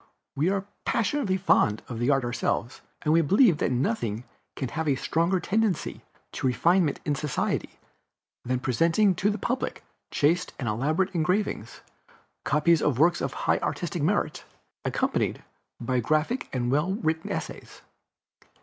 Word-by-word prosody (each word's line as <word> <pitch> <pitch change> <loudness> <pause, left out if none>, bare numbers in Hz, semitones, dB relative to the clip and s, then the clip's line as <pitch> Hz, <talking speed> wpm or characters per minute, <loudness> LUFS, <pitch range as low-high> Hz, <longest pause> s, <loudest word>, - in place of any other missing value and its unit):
We 155 +6 +2
are 195 0 -1 0.2
passionately 230 -4 0
fond 110 - +2
of 120 -2 -5
art 135 -2 +3
ourselves, 120 0 -2 0.2
and 155 - +2
we 165 - +5
believe 185 - +4
that - - +1
nothing 115 -3 -1 0.3
can 130 - -3
have 160 +5 -3
a 140 - +3
stronger 170 +7 +1
tendency 210 -1 -1 0.3
to - - -2
refinement 165 +4 +2
in 150 - +1
society 145 0 -2 0.7
than 125 0 -1
presenting 165 - +3
to 195 +3 +1
the 210 - -1
public 250 +5 -3 0.3
chaste 170 +5 +1
and 125 - -4
elaborate 155 - 0
engravings, 180 - -1 0.6
copies 160 +2 +3
of 140 -5 +1
works 170 +5 +3
of - - -2
high - - +3
artistic - - -3
merit, - - 0 0.4
accompanied - - -1 0.4
by 125 +1 0
graphic 155 - 0
and 120 -1 -1
well 150 +7 +1
written 160 -7 -2
essays. - - -6
155 Hz, 140 wpm, -26 LUFS, 130-185 Hz, 0.7 s, we